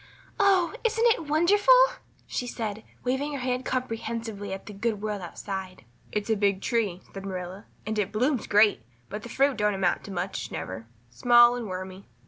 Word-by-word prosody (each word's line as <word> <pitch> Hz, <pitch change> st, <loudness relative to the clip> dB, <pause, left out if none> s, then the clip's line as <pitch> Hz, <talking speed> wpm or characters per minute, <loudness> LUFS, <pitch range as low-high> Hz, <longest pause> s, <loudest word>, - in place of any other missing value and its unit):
"Oh, 390 Hz, -3 st, +4 dB
isn't 460 Hz, 0 st, +2 dB
it 325 Hz, -, -7 dB
wonderful?" 395 Hz, +10 st, +5 dB, 0.5 s
she 245 Hz, -, -3 dB
said, 220 Hz, -2 st, -4 dB, 0.2 s
waving 265 Hz, +4 st, -1 dB
her 280 Hz, -, -3 dB
hand 250 Hz, 0 st, -2 dB
comprehensively 225 Hz, -4 st, -3 dB
at 190 Hz, 0 st, -6 dB
the 210 Hz, -, -8 dB
good 215 Hz, +1 st, -1 dB
world 210 Hz, -1 st, -3 dB
outside. 185 Hz, -, -6 dB, 0.3 s
"It's 210 Hz, -1 st, -2 dB
a -, -, +4 dB
big 200 Hz, -2 st, +1 dB
tree," 205 Hz, -5 st, -1 dB
said 195 Hz, -, -7 dB
Marilla, 185 Hz, +1 st, -6 dB, 0.2 s
"and 215 Hz, 0 st, -2 dB
it 200 Hz, -2 st, -1 dB
blooms 250 Hz, +3 st, 0 dB
great, 210 Hz, -, +4 dB, 0.3 s
but 210 Hz, -, -5 dB
the 235 Hz, -, -9 dB
fruit 275 Hz, +2 st, +2 dB
don't 210 Hz, -1 st, +1 dB
amount 185 Hz, -2 st, +1 dB
to 200 Hz, -, -8 dB
much 185 Hz, +1 st, -3 dB
never 110 Hz, +5 st, -6 dB, 0.2 s
small 240 Hz, -, +6 dB
and 240 Hz, -3 st, -4 dB
wormy." 185 Hz, +1 st, -7 dB
215 Hz, 175 wpm, -27 LUFS, 195-250 Hz, 0.5 s, small